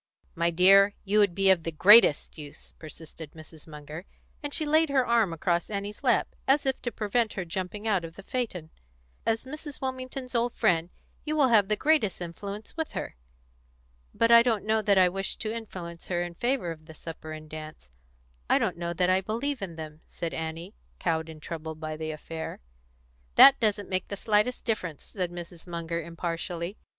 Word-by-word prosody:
"My 170 +1 +1
dear, 195 +4 +6
you 205 +2 +3
would 200 -4 +3
be 195 -1 +5
of 185 -3 +3
the 165 - -4
greatest 195 0 +6
use," 145 -2 -10
persisted 160 0 -10 0.3
Munger, 150 +3 -9 0.4
and 290 -1 -5
she 310 - -1
laid 310 +1 +3
her 265 -2 +2
arm 230 -6 +3
across 170 +1 -1
Annie's 205 0 -5
lap, - - +3 0.2
as 280 +2 +3
if 265 -1 -1
to 240 - -3
prevent 220 +1 0
her 190 - -4
jumping 190 +4 -5
out 200 -5 +2
of 165 0 -8
the 195 - -11
phaeton. 190 -10 -4 0.6
"As 225 +2 0
Mrs. 295 +1 -8
Wilmington's 260 0 -5
old 235 0 0
friend, 170 -1 +2 0.3
you 305 0 -2
will 285 -4 +4
have 210 -4 +5
the 210 - +1
greatest 295 - +2
influence 200 +5 -7
with 320 -1 -3
her." - - -5 1.0
"But 230 - +2
I 235 0 +10
don't 230 -4 0
know 220 0 +2
that 200 -2 +3
I 185 -1 +6
wish 195 +2 -3
to 220 -1 -3
influence 180 -7 -8
her 175 -1 0
in 175 0 -6
favour 240 -2 -1
of 155 -1 -11
the 160 - -11
supper 160 0 -8
and 155 0 -8
dance; 155 - -10 0.6
I - - +5
don't - - -1
know 170 0 -3
that 180 +1 +2
I 185 +1 +3
believe 235 +7 -3
in 180 -4 -5
them," 155 -1 -9
said 170 -1 -5
Annie, 165 +4 -5 0.2
cowed 160 -1 -1
and 160 -1 -10
troubled 160 0 -7
by 155 0 -4
the 155 0 -5
affair. 160 +1 -6 0.8
"That 275 0 +9
doesn't 210 -2 0
make 185 0 -2
the 200 - -5
slightest 215 +4 +1
difference," 185 - -2
said 185 -4 -4
Mrs. 175 0 -9
Munger 170 -1 -3
impartially. 170 +2 -4
185 Hz, 190 wpm, -28 LUFS, 165-225 Hz, 1.0 s, I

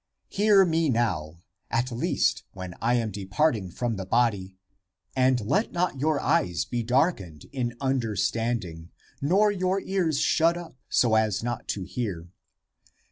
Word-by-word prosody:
" - - -52
Hear 205 -2 +6
me 165 -2 +1
now, 85 - -1 0.3
at 120 +2 0
least, 120 - 0
when 95 -2 -7
I 120 +2 +2
am 115 -3 -1
depart 105 +10 +1
ing 95 -4 -6
from 115 +4 -3
the 95 - -5
body; 100 -5 +1 0.6
and 130 -1 +3
let 165 - 0
not 175 -6 -1
your 155 +1 +1
eyes 145 - +1
be 120 -1 -2
dark 130 +8 +2
ened 80 -6 -12
in 120 -3 -3
understanding, 115 -8 -1 0.3
nor 195 +9 +3
your 185 0 0
ears 180 -7 0
shut 165 +1 +3
up, 170 -4 -9
so 120 -3 +3
as 110 -1 +2
not 120 0 -4
to 100 - -3
hear 90 -3 -4
120 Hz, 155 wpm, -26 LUFS, 100-160 Hz, 0.6 s, Hear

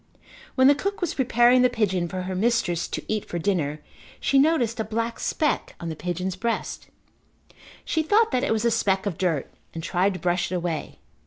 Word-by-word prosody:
When 260 - +4
the 285 - +8
cook 400 +8 -3
was 355 -4 -1
preparing 250 -1 +4
the 250 - +5
pigeon 195 -7 0
for 185 +2 -4
her 185 +1 -4
mistress 185 -4 +1
to - - -5
eat 215 -1 -1
for 175 - -5
dinner 160 -5 -1 0.4
she 275 - +3
noticed 265 -7 +2
a - - +1
black 230 +1 -3
speck 300 -3 -1
on 170 - -5
the 160 - -4
pigeon's 180 +3 -3
breast. 230 +5 -3 1.0
She 320 - +1
thought 420 +8 +3
that 255 -1 +1
it - - 0
was 220 +1 +1
a 235 - +3
speck 195 -3 +1
of 195 -5 -3
dirt 165 -7 -1 0.2
and 165 - -5
tried 185 +3 +1
to - - -6
brush 175 0 0
it - - -1
away. 170 -3 -3
210 Hz, 200 wpm, -25 LUFS, 180-250 Hz, 1.0 s, the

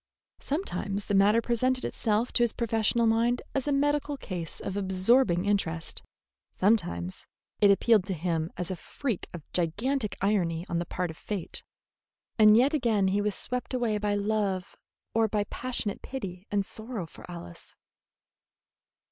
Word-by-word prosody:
Sometimes 205 - -2
the - - -2
matter 205 +4 +5
presented 255 +2 +1
itself 220 +2 0
to - - +1
his 235 -2 +3
professional 230 0 +1
mind 230 +2 +2
as 275 0 -1
a - - +2
medical 290 +1 +1
case 180 -9 -5
of 195 - -4
absorbing 190 0 +3
interest; 170 -5 -1 0.5
sometimes 130 - 0 0.3
it 205 - +6
appealed 210 +1 +5
to 190 -1 -2
him 165 -1 -1
as 180 0 -3
a - - -2
freak 230 - -4
of 175 -4 -8
gigantic 210 - 0
irony 180 -4 +1
on 170 - -1
the 170 - -3
part 180 -2 -2
of 160 - -13
fate; 200 -5 -4 0.8
and 215 0 +8
yet 265 +5 +4
again 225 -9 +2
he 200 +2 +1
was 210 -1 0
swept 250 +1 -1
away 230 -4 0
by 205 0 0
love 200 -3 -1 0.4
or 225 0 +3
by 210 -1 0
passionate 240 -5 -2
pity 195 -8 -6
and 200 -1 0
sorrow 220 -3 -5
for - - -14
Alice. 170 - -9
205 Hz, 155 wpm, -28 LUFS, 185-235 Hz, 0.8 s, and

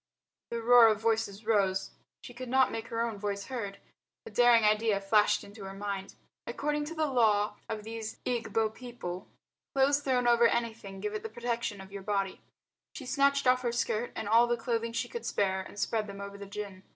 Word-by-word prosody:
The 230 -1 -4
roar 240 0 +8
of 215 -2 +2
voices 220 -2 -1
rose. 195 -3 +1 0.3
She 245 - -10
could 250 +1 -7
not 265 +1 +4
make 225 - -5
her 230 0 -2
own 230 -3 -2
voice 200 -1 -3
heard. 205 -7 -5 0.5
A 455 - -9
daring 240 -2 +5
idea 215 -1 +3
flashed 210 +1 +3
into 205 0 -11
her 195 0 -7
mind. 195 -1 -5 0.3
According 295 +5 -1
to 325 +3 -7
the 315 -1 +1
law 215 -6 +2
of 215 -1 -4
these 225 0 -6
Egbo 225 -2 0
people, 220 -7 -7 0.5
clothes 275 +1 +4
thrown 255 -3 +1
over 235 0 +6
anything 220 -5 -3
give 210 0 -3
it 215 - -3
the 225 - -6
protection 235 -2 -3
of 190 0 -11
your 200 0 -6
body. 195 -1 -2 0.5
She 275 - -7
snatched 280 +1 +2
off 255 0 +4
her 240 -2 0
skirt 235 0 -1
and 205 - -4
all 230 +3 +5
the 240 0 +1
clothing 230 0 -1
she 230 - -2
could 470 - -6
spare 190 -1 0
and 190 - -11
spread 215 0 0
them 200 0 -8
over 200 0 -7
the 200 0 -9
gin. 200 -2 -7
225 Hz, 200 wpm, -30 LUFS, 200-240 Hz, 0.5 s, roar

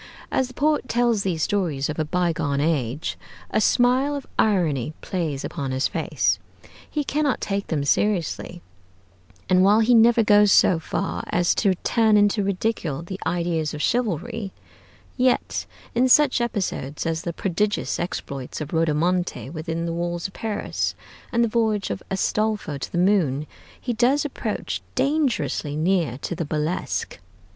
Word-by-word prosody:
As 260 - +1
the 255 - -14
poet 295 -3 +1
tells 240 -3 +2
these 175 -5 -1
stories 165 -9 0
of 150 - -4
a - - +2
bygone 160 -4 0
age, 145 -3 -1 0.3
a 215 - +2
smile 255 +6 +3
of 280 - -5
irony 160 - +2
plays 160 -7 -3
upon 140 -5 -4
his 130 +2 +1
face; - - 0 0.5
he 300 - -1
cannot 285 -2 0
take 200 0 -2
them 150 -4 -1
seriously; 175 +1 0 0.8
and 185 0 +4
while 205 +3 +5
he 235 +2 +4
never 230 0 +6
goes 205 -1 +5
so 175 -3 +5
far - - -3
as 175 0 +2
to 195 -3 +2
turn 220 -2 +4
into 205 +1 +3
ridicule 185 -6 -1
the 190 +2 -7
ideals 170 -3 -1
of 150 - -5
chivalry, 225 -2 -1 0.7
yet, 255 -1 +1 0.3
in 255 +2 +3
such 280 -2 +5
episodes 190 - -2
as 165 0 -1
the 170 - -3
prodigious 205 +4 -1
exploits 140 -6 -5
of 155 0 -6
Rodomonte 165 -1 0
within 165 +1 -3
the 165 - -2
walls 175 0 -3
of 195 - -4
Paris, 215 -2 -2 0.4
and 235 0 +2
the - - +3
voyage 220 -3 0
of - - -4
Astolfo 200 -5 -1
to - - -6
the - - -3
moon, 175 -7 +2 0.3
he 245 - -2
does 255 +6 +2
approach 290 - -3
dangerously 275 - 0
near 160 -5 +1
to - - -2
the 170 0 -3
burlesque. 155 +3 -2
185 Hz, 150 wpm, -23 LUFS, 160-225 Hz, 0.8 s, never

